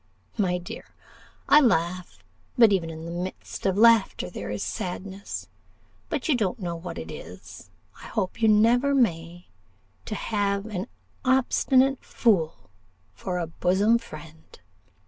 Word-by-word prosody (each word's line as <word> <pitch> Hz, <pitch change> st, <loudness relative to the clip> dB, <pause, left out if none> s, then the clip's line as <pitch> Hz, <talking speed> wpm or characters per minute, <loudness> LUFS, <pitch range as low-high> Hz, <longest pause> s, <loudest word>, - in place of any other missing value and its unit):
My 180 Hz, -4 st, +1 dB
dear, 175 Hz, -1 st, -8 dB, 0.6 s
I 300 Hz, -, +7 dB
laugh; 180 Hz, -, 0 dB, 0.3 s
but 230 Hz, -4 st, +7 dB
even 170 Hz, -4 st, 0 dB
in 160 Hz, 0 st, -8 dB
the 170 Hz, -, -6 dB
midst 180 Hz, +2 st, -5 dB
of 190 Hz, 0 st, 0 dB
laughter 230 Hz, -2 st, +4 dB
there -, -, -6 dB
is -, -, -3 dB
sadness. 195 Hz, 0 st, -5 dB, 0.6 s
But -, -, -2 dB
you 310 Hz, -, +4 dB
don't 210 Hz, -3 st, -1 dB
know 175 Hz, -5 st, -4 dB
what 170 Hz, +1 st, -7 dB
it -, -, -7 dB
is -, -, -11 dB, 0.3 s
I -, -, -9 dB
hope 205 Hz, 0 st, -3 dB
you 225 Hz, -, +5 dB
never 235 Hz, +6 st, +4 dB
may 175 Hz, -7 st, -1 dB, 0.6 s
to 215 Hz, -, -4 dB
have 200 Hz, -1 st, -1 dB
an 210 Hz, -1 st, -4 dB, 0.4 s
obstinate 265 Hz, +1 st, +2 dB
fool 165 Hz, -, 0 dB, 0.4 s
for 180 Hz, -, -4 dB
a 175 Hz, -, -1 dB
bosom 190 Hz, +7 st, +2 dB
friend. 160 Hz, -7 st, -13 dB
195 Hz, 140 wpm, -25 LUFS, 175-230 Hz, 0.6 s, I